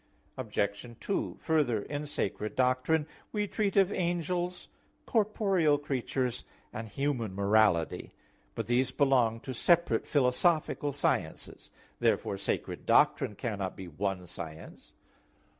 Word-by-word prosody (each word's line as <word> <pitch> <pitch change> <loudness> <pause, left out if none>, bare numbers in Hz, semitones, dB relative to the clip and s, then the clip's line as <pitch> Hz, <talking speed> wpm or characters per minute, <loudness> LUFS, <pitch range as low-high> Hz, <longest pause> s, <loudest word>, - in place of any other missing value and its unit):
Obj. 110 -1 -3
2: 200 - -2
Further, 140 -10 +1
in 150 0 -4
sacred 105 -5 -3
doctrine 130 +5 +2 0.3
we 210 -1 0
treat 205 -1 -1
of 195 0 +5
angels, 175 0 -1 0.4
corporeal 195 - +2
creatures 130 -3 -2 0.3
and 110 0 -6
human 120 -5 -2
morality. 100 -4 +2 0.5
But - - -3
these 120 +3 +2
belong 125 -5 +2
to 130 - -5
separate 170 -3 +2
philosophical 145 +2 +2
sciences. 145 - -2 0.3
Therefore 100 - +1
sacred 100 - -3
doctrine 105 - +4
cannot 100 -4 -3
be 95 - -7
one 90 +3 -3
science. 80 -2 -9
130 Hz, 110 wpm, -30 LUFS, 105-160 Hz, 0.5 s, of